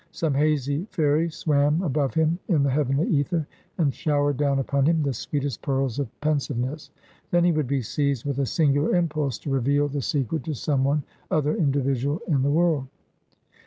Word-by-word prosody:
Some 160 -4 -1
hazy 145 +3 0
fairy 160 -1 +1
swam 155 0 +1
above 145 -3 0
him 160 +2 +2
in 155 -7 +2
the 140 - +2
heavenly 140 +2 +1
ether, 155 +1 +1 0.3
and 145 -6 +1
showered 145 -2 0
down 140 -1 +1
upon 135 +1 +1
him 165 -1 +2
the 140 -2 0
sweetest 140 +1 -3
pearls 135 -2 -1
of 140 -5 -2
pensiveness. 145 -1 -2 0.4
Then 175 0 +3
he 175 - +4
would 155 -4 0
be 135 -1 0
seized 140 +1 -1
with 140 -1 -2
a 135 - +1
singular 145 +5 +2
impulse 150 -8 0
to 140 - -6
reveal 140 +2 +2
the 145 0 -3
secret 140 +5 -1
to 155 -3 -3
some 135 0 0
one 140 +2 +1 0.3
other 150 -1 +1
individual 140 0 0
in 145 -6 +2
the 140 - +1
world. 155 -3 +2
145 Hz, 180 wpm, -25 LUFS, 135-155 Hz, 0.4 s, he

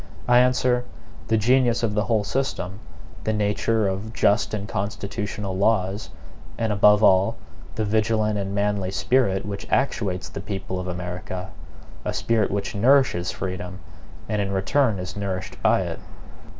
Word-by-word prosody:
I 125 0 +6
answer: 125 0 +3 0.4
the 110 - +3
genius 120 +2 +3
of 110 -2 +1
the 105 +1 +1
whole 110 -3 +1
system; 100 -6 -2 0.4
the 110 - 0
nature 105 +1 +1
of 100 +4 -3
just 110 -2 +2
and 105 -1 -3
constitutional 100 0 -4
laws; 100 0 +1 0.5
and 110 -2 0
above 105 +1 +5
all, 95 0 +5 0.4
the 110 - -1
vigilant 110 0 +1
and 100 0 -3
manly 100 -2 0
spirit 95 -1 +1
which 100 -1 -6
actuates 100 -9 0
the 100 - -7
people 95 -2 -4
of 90 - -4
America 90 +1 -5 0.5
a - - -2
spirit 115 -3 +1
which 100 0 -2
nourishes 115 -5 +3
freedom, 90 -1 -5 0.5
and 105 -1 0
in 100 -1 -2
return 110 +4 +2
is 90 0 -6
nourished 95 -2 -4
by - - +4
it. - - -4
105 Hz, 150 wpm, -24 LUFS, 95-110 Hz, 0.5 s, I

